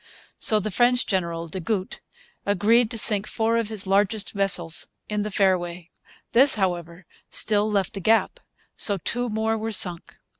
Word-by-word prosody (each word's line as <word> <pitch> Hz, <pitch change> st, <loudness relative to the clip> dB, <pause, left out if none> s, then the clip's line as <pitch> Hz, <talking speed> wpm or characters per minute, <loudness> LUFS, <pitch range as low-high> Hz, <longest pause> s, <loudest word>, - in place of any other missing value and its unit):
So 215 Hz, -, +3 dB
the 210 Hz, +1 st, -4 dB
French 245 Hz, +4 st, +2 dB
admiral, 170 Hz, -2 st, -2 dB
des 175 Hz, +4 st, -6 dB
Gouttes, 190 Hz, +1 st, -3 dB, 0.4 s
agreed 215 Hz, +4 st, +2 dB
to 230 Hz, -, -6 dB
sink 210 Hz, -2 st, +3 dB
four 225 Hz, +1 st, 0 dB
of 230 Hz, -2 st, -2 dB
his 215 Hz, -3 st, -1 dB
largest 200 Hz, +2 st, 0 dB
vessels 195 Hz, -5 st, +1 dB, 0.2 s
in 210 Hz, -1 st, -2 dB
the 210 Hz, -, -3 dB
fairway. 180 Hz, -3 st, -1 dB, 0.4 s
This, 265 Hz, +4 st, +4 dB
however, 175 Hz, -3 st, -3 dB, 0.2 s
still 210 Hz, 0 st, +1 dB
left 200 Hz, +1 st, -1 dB
a -, -, -3 dB
gap; 225 Hz, -, +1 dB, 0.4 s
so 200 Hz, -2 st, +1 dB
two 245 Hz, +7 st, -2 dB
more 220 Hz, +1 st, -1 dB
were 225 Hz, +1 st, -4 dB
sunk. 180 Hz, -4 st, +1 dB
205 Hz, 160 wpm, -23 LUFS, 185-220 Hz, 0.4 s, This